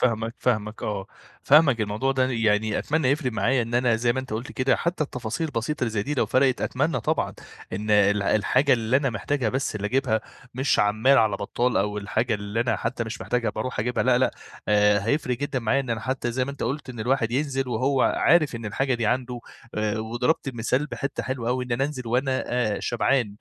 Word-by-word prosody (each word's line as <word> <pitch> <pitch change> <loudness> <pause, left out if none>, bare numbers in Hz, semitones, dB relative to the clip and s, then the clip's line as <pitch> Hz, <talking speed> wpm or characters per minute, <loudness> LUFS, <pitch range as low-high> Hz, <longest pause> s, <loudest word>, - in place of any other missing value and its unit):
فاهمك، 115 -2 0
فاهمك 110 -3 -1
آه. 100 -2 -3 0.4
فاهمك، 140 -5 +5
الموضوع 110 +6 0
ده 130 -1 +1
يعني 110 -2 +1
أتمنى 150 -3 0
يفرِق 140 -3 0
معايا، 115 +4 +1
إن 115 +1 -5
أنا 120 -2 +3
زي 120 +1 +1
ما 130 - -2
أنت 130 -3 -9
قلت 115 +4 -4
كده، 130 0 +2
حتى 170 -2 -1
التفاصيل 125 +4 -4
البسيطة 145 +1 -3
اللي 120 - +1
زي 105 -2 -1
دي، 145 +7 -3
لو 135 - +1
فرِقت 130 -1 +2
أتمنى 135 0 0
طبعًا - - -1 0.4
إن 105 +3 -3
ال 105 -1 +4
الحاجة 130 +8 +2
اللي 115 +1 +2
أنا 135 -1 +1
محتاجها 120 +4 -1
بس 130 0 -2
اللي 105 -1 -3
أجيبها، 120 -1 +1 0.3
مش 130 +3 +1
عمّال 110 +7 +4
على 110 -3 +2
بطّال، 120 +5 -1
أو 105 +1 0
الحاجة 110 +3 -1
اللي 105 +2 -3
أنا 120 - +1
حتى 115 0 -3
مش 110 0 -6
محتاجها 120 -3 -1
بارُوح 110 +5 -4
أجيبها، 125 +3 0
لأ 125 -1 +4
لأ، 130 - +2 0.4
آآ، 105 0 +4
هيفرِق 125 -2 0
جدًا 140 -1 -2
معايا 125 +3 +1
إن 130 -3 -5
أنا- 115 -1 -1
حتى 120 -2 -3
زي 130 +1 0
ما 140 - -5
أنت 140 - -7
قُلت- 135 +3 -3
إن 120 -3 -8
الواحد 120 0 +1
ينزِل 135 -1 -1
وهو 130 +3 +1
عارف 160 -6 +3
إن 115 -1 -6
الحاجة 130 +5 0
دي 115 -2 -1
عنده، 125 +1 -1 0.6
وضربت 120 +7 -1
المثال 125 +3 -1
بحتّة 135 -1 -4
حلوة 130 -3 -3
أوي، 125 +1 0
إن 125 - -4
أنا 125 +3 +1
أنزل 135 -4 -5
وأنا 130 +3 0 0.4
شبعان؛ 120 +1 +1
125 Hz, 210 wpm, -25 LUFS, 110-135 Hz, 0.6 s, فاهمك